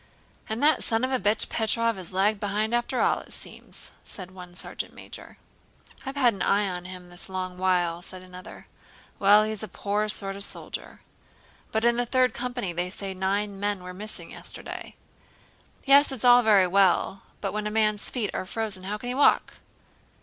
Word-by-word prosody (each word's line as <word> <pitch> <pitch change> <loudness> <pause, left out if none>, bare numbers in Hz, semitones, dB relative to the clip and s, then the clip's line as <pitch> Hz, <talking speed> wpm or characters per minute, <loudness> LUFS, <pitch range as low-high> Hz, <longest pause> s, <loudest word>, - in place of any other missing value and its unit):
"And 220 +5 -2
that 300 -2 +5
son 225 0 0
of 260 - +1
a 260 - +2
bitch 210 +3 +2
Petróv 230 +1 +1
has 185 -2 -8
lagged 200 +3 +2
behind 210 +2 -1
after 240 +2 +1
all, - - +3
it - - -13
seems," - - -9
said 185 -2 -8
one 180 -1 -11
sergeant - - -4
major. - - -9 0.7
"I've 270 - -4
had 250 -4 +4
an 195 - -8
eye 205 0 +3
on 180 -1 -4
him 180 -1 -9
this 175 +2 -9
long 185 -1 -4
while," 175 -2 +1
said 185 +1 -8
the 180 - -13
other. 185 - -10 0.5
"Well, 205 +2 +7
he's 215 -1 -2
a 215 - -3
poor 210 +2 -1
sort 195 -2 +1
of 200 - -4
soldier...." - - -5 0.7
"But 220 +1 +1
in 235 0 +4
the 245 0 0
Third 255 0 +3
Company 245 -6 -3
they 175 +2 -1
say 195 +1 -4
nine 195 +2 -1
men 205 -2 -1
were 180 0 -7
missing 210 +3 -7
yesterday." - - -7 0.9
"Yes, 280 +1 +6
it's 255 -3 -3
all 245 0 +8
very 210 -5 +6
well, 190 +1 +3 0.2
but 195 - -2
when 210 0 -1
a - - -1
man's 215 -1 +2
feet 225 -6 -2
are 185 - -3
frozen 205 -3 -3
how 205 +2 -2
can 245 +3 -6
he - - -1
walk?" 280 +3 +3
205 Hz, 195 wpm, -27 LUFS, 185-230 Hz, 0.9 s, all